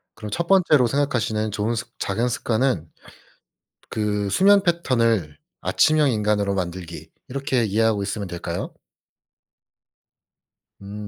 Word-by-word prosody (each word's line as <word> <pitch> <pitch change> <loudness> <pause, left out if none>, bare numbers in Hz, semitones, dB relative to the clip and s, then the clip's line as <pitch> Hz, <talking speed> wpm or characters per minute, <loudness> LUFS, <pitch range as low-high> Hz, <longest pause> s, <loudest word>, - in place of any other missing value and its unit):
그럼 105 -2 -8
첫 170 +6 -2
번째로 155 -10 +4
생각하시는 115 -6 -1
좋은 110 +3 -1
습 115 - -5
작은 115 +5 -1
습관은 110 - -1 1.0
그 105 -2 -1
수면 200 - +5
패턴을 115 - +1 0.3
아침형 155 -3 +3
인간으로 105 -2 0
만들기 85 -2 -5 0.2
이렇게 135 -2 -1
이해하고 110 0 +1
있으면 100 -1 -4
될까요? 85 0 -5 2.1
음 105 +1 -8
110 Hz, 265 characters per minute, -23 LUFS, 100-135 Hz, 2.1 s, 수면